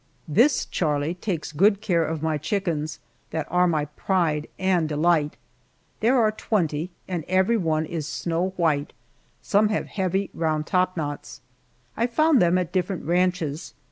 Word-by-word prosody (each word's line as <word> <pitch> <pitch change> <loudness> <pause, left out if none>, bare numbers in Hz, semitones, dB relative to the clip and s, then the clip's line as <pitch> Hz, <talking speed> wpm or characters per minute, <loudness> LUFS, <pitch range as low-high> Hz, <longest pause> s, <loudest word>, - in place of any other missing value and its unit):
This 240 - +3
Charlie 150 -1 -1
takes 180 -4 -4
good 195 +6 +3
care 180 -6 +1
of 160 -1 -3
my 155 -2 0
chickens 160 -3 -2 0.3
that 160 -2 -3
are 180 +1 +4
my 155 -3 +1
pride 155 -1 -1
and 180 -4 +1
delight. 155 0 +1 0.6
There 240 +4 +3
are 215 -2 +3
twenty, 170 -7 -1 0.2
and 175 -4 -3
every 190 +5 +3
one 160 -6 0
is 155 -2 -4
snow 170 +4 -2
white; 155 -5 +1 0.5
some 210 +1 +3
have 210 - -1
heavy 190 0 -2
round 155 -2 -1
topknots. 165 -8 -2 0.5
I 235 - +1
found 310 +3 +3
them 175 +1 +4
at 180 -2 -2
different 185 -1 -2
ranches. 175 -2 0
175 Hz, 145 wpm, -24 LUFS, 155-190 Hz, 0.6 s, are